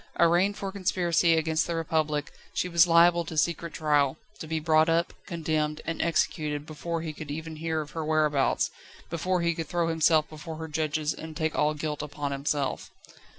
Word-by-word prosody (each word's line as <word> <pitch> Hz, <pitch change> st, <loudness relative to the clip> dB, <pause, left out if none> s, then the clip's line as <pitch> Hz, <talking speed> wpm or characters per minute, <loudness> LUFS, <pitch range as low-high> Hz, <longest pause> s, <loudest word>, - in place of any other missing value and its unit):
Arraigned 175 Hz, +4 st, +4 dB
for 195 Hz, -1 st, -4 dB
conspiracy 175 Hz, -3 st, +2 dB
against 160 Hz, 0 st, +1 dB
the 170 Hz, -, -2 dB
Republic, 155 Hz, -2 st, -1 dB, 0.2 s
she -, -, 0 dB
was 170 Hz, 0 st, +5 dB
liable 170 Hz, +1 st, +5 dB
to 160 Hz, -1 st, -7 dB
secret 170 Hz, 0 st, 0 dB
trial, 145 Hz, -2 st, +2 dB, 0.2 s
to 160 Hz, -, -7 dB
be 160 Hz, 0 st, -1 dB
brought 155 Hz, 0 st, +3 dB
up, 170 Hz, +1 st, +1 dB
condemned, 155 Hz, -3 st, -1 dB
and 165 Hz, -, -2 dB
executed 150 Hz, -3 st, 0 dB
before 165 Hz, +2 st, -4 dB
he 155 Hz, -2 st, -4 dB
could 155 Hz, -1 st, -9 dB
even 160 Hz, +2 st, -5 dB
hear 160 Hz, 0 st, -1 dB
of 150 Hz, -, -9 dB
her 160 Hz, -, -4 dB
whereabouts, 150 Hz, -3 st, +2 dB, 0.4 s
before 180 Hz, +2 st, 0 dB
he 170 Hz, 0 st, +2 dB
could 165 Hz, -1 st, -5 dB
throw 170 Hz, 0 st, 0 dB
himself 160 Hz, -1 st, +3 dB
before 155 Hz, +1 st, -8 dB
her 160 Hz, 0 st, -6 dB
judges 155 Hz, 0 st, -1 dB
and 160 Hz, -1 st, -8 dB
take 160 Hz, -1 st, -1 dB
all 150 Hz, +1 st, +2 dB
guilt 150 Hz, 0 st, -3 dB
upon 145 Hz, -1 st, -4 dB
himself. 140 Hz, 0 st, -2 dB
160 Hz, 185 wpm, -27 LUFS, 150-170 Hz, 0.4 s, was